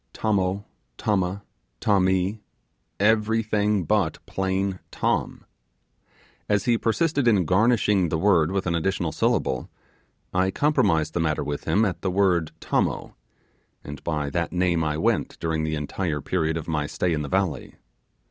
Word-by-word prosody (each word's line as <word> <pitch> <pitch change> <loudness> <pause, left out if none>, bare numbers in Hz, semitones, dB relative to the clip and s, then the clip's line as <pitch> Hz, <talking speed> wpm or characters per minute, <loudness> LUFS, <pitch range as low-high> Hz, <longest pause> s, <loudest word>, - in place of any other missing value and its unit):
'Tommo,' 100 -2 0 0.3
'Tomma', 100 -1 -1 0.4
'Tommee', 95 +1 +1 0.6
everything 105 -1 +2
but - - +1
plain 95 0 -1
'Tom'. - - -1 1.0
As 105 -1 +1
he 120 - +3
persisted 140 +4 +1
in 100 -6 +4
garnishing 100 -1 +3
the 80 - 0
word 85 -3 +3
with 95 0 -1
an 85 - 0
additional 85 0 -1
syllable, 65 -3 0 0.6
I 95 +1 +2
compromised 95 - +1
the - - -1
matter 75 -3 0
with 70 0 -4
him 110 +2 +3
at 95 - -3
the 95 - -1
word 90 -4 +2
'Tommo'; - - -1 0.7
and 75 +1 -9
by 75 -4 -2
that 85 +3 -1
name 90 -2 +1
I 75 -1 -1
went 80 - 0
during 80 -1 -1
the 80 0 -1
entire 75 +1 -2
period 80 +2 -1
of 80 - -6
my 75 -3 -1
stay 90 +2 -1
in 75 - -1
the 70 - -5
valley. 95 -4 -1
95 Hz, 145 wpm, -24 LUFS, 80-100 Hz, 1.0 s, in